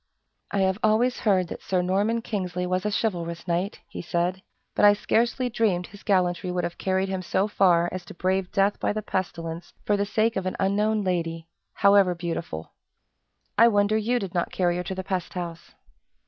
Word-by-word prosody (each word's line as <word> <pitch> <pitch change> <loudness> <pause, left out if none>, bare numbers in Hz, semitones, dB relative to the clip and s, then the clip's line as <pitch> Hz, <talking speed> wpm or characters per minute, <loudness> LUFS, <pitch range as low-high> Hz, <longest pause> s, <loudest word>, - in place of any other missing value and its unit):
"I 200 - 0
have 190 +1 +1
always 225 +4 +2
heard 190 -5 +2
that - - -7
Sir 185 -2 0
Norman 205 +5 +1
Kingsley 180 -5 -3
was 185 +2 -1
a - - -1
chivalrous 170 -6 -2
knight," 175 +4 -1
he - - -7
said; 175 +2 -1 0.3
"but - - 0
I 205 0 +9
scarcely 235 +4 +1
dreamed 210 -7 +1
his 205 +2 -14
gallantry 180 -3 +1
would 180 0 -1
have 170 - -4
carried 190 0 0
him 190 -1 -2
so 190 +3 0
far 175 -4 +3
as 185 -1 -5
to - - -11
brave 185 +1 0
death 195 +1 +2
by - - 0
the 215 0 -3
pestilence 170 -3 -4
for 205 - +3
the 200 0 0
sake 220 +2 +1
of 190 -1 -1
an 185 - -2
unknown 210 +2 +1
lady 165 -3 -2 0.3
however 200 -2 +5
beautiful. 165 - -5 0.9
I 230 - +8
wonder 205 -1 +3
you 225 +3 +1
did 195 -6 -4
not 175 -2 -1
carry 175 -1 +1
her 180 - -2
to 190 - -4
the 190 - -4
pest 185 -2 -3
house." 170 -2 -6
190 Hz, 195 wpm, -25 LUFS, 175-205 Hz, 0.9 s, I